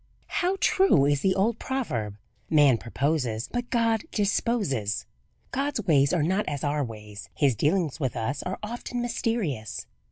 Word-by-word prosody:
How 365 +2 +1
true 375 - +4
is 145 -1 +2
the 190 -1 +2
old 220 +4 +1
proverb 125 - -2 0.3
"Man 145 -6 +5
proposes 125 -3 -1
but 245 0 -4
God 230 -2 +2
disposes!" 200 - 0 0.5
God's 275 -3 -1
ways 140 -4 +4
are 170 -4 +2
not 190 +6 +1
as 145 -2 -4
our 145 0 +1
ways. 105 -3 -8
His 140 -5 +3
dealings 160 - +1
with 130 -6 -1
us 120 +5 -2
are 185 - -4
often 240 +2 -4
mysterious. 225 - -2
155 Hz, 150 wpm, -27 LUFS, -, 0.5 s, Man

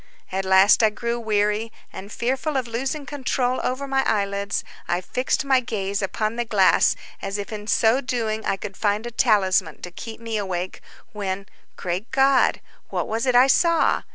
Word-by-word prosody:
At 190 +1 -2
last 190 +3 +6
I 220 - +5
grew 235 +2 -3
weary, 210 0 0 0.2
and 200 +2 -9
fearful 265 +6 -1
of 255 -2 -2
losing 270 +5 -3
control 255 -2 -1
over 265 +2 -2
my 270 0 +1
eyelids, 200 -2 -1 0.2
I 175 - 0
fixed 255 +9 -1
my 265 -2 +4
gaze 200 -5 -3
upon 215 +3 -2
the 240 - 0
glass, 205 -5 +4 0.3
as 195 +1 -3
if 205 +2 -6
in 210 0 -7
so 230 +4 +3
doing 225 -4 -2
I 195 - 0
should 200 -2 -7
find 210 +2 0
a 240 - -5
talisman 190 -8 +2
to 180 - -6
keep 225 +5 -8
me 230 -1 -3
awake, 185 -3 -4 0.3
when, 195 -2 -3 0.3
great 180 +5 -3
God! 270 0 +3 0.3
what - - -2
was 225 +3 -2
it 250 - +2
I 250 +1 +8
saw! 335 +5 +3
220 Hz, 180 wpm, -23 LUFS, 200-250 Hz, 0.3 s, I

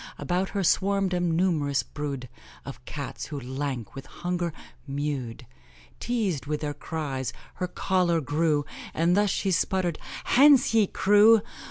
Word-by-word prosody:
About 185 +2 -1
her 195 - +1
swarmed 195 +1 +2
a 180 - +1
numerous 165 -5 +1
brood 140 -3 -5 0.4
Of 135 -2 -9
Cats, 125 -5 -6
who, 145 -2 -5
lank 130 -2 -4
with 135 0 -9
hunger, 175 -1 -3 0.4
mewed; 140 -4 -4 0.5
Teased 205 - -1
with 150 0 -2
their 150 -1 -2
cries, 145 -5 -4 0.3
her 180 - +1
choler 180 -2 +1
grew, 150 +1 +1 0.3
And 170 +2 +3
thus 205 0 +3
she 195 0 0
sputtered 180 -2 0 0.2
'Hence, 275 -2 +5
ye 220 -3 +4
crew! 210 +3 +5
165 Hz, 140 wpm, -26 LUFS, 145-190 Hz, 0.5 s, Hence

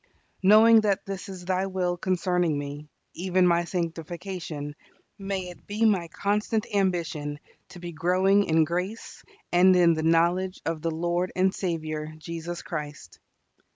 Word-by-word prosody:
Knowing 220 +3 +7
that 205 -3 0
this 195 -1 -6
is 185 -2 -8
Thy 185 +1 0
will 180 -2 -1
concerning 180 -3 0
me, 145 +1 -6 0.2
even 185 +1 +1
my 170 -1 +3
sanctification, 165 -3 -5 0.4
may 195 -2 -3
it 175 - -14
be 210 +2 0
my 190 -6 +2
constant 210 +4 -1
ambition 170 -6 -1 0.3
to 180 - -11
be 175 0 -6
growing 185 +5 +2
in 160 0 +3
grace 180 +7 -4 0.3
and 185 +1 +6
in 175 -2 +5
the 160 - -2
knowledge 170 +3 +2
of 165 -1 -2
the 165 - -1
Lord 175 +2 -1
and 190 +1 +2
Saviour 155 -3 -4
Jesus 170 +2 -6
Christ. 150 -2 -7
175 Hz, 145 wpm, -26 LUFS, 165-190 Hz, 0.4 s, Knowing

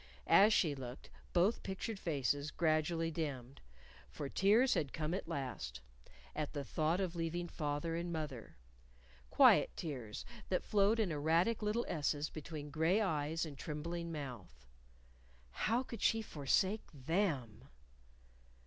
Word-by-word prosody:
As 205 +3 +7
she 165 -8 +3
looked, 130 -2 -8 0.2
both 185 +6 +3
pictured 195 +2 -4
faces 145 -3 0
gradually 165 +1 +1
dimmed. 140 -5 -4 0.5
For 140 - -5
tears 220 - +4
had 140 -4 -1
come 155 +1 -2
at 190 - -3
last 130 - -4 0.5
at 150 -1 -3
the 145 -2 -3
thought 155 +6 0
of 180 -3 -2
leaving 170 +1 -2
father 150 0 -2
and 170 +1 -3
mother 150 - -5 0.7
quiet - - +6
tears 125 -10 -5 0.2
that 185 - +1
flowed 210 +2 +3
in 205 -6 +1
erratic 165 +9 +2
little 215 +3 0
S's 150 -1 -1
between 150 -1 -7
gray 165 +6 +3
eyes 160 -5 0
and 150 -3 -7
trembling 170 +2 -4
mouth. 115 - -7 0.9
How 230 - +1
could 230 -4 -8
she 225 -1 +3
forsake 190 +6 0
_them? 145 - -1
160 Hz, 130 wpm, -36 LUFS, 145-185 Hz, 0.9 s, As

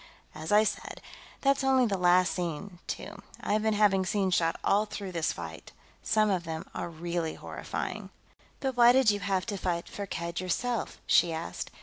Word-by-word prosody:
As 155 +3 -6
I 210 +1 +6
said, 220 - -3 0.4
that's 275 0 +2
only 265 -1 +4
the 205 -4 0
last 180 0 +4
scene, 175 +1 -4
too. - - -6 0.2
I've 215 +1 0
been 220 0 +1
having 200 -2 +4
scenes 190 -1 0
shot 165 -1 +1
all 210 +2 +3
through 200 -2 -6
this 165 -3 0
fight; 80 -3 -8 0.3
some 215 -1 +2
of 180 -3 0
them 160 -1 -5
are - - -4
really 170 0 -3
horrifying." - - -5 0.5
"But 265 -2 -1
why 240 0 +7
did 260 -4 +5
you 205 - -2
have 190 -1 0
to 205 -3 -3
fight 170 -2 -2
Firkked 170 -3 -4
yourself?" 230 +6 -2
she 170 - +4
asked. 160 +1 -4
190 Hz, 180 wpm, -29 LUFS, 170-215 Hz, 0.5 s, why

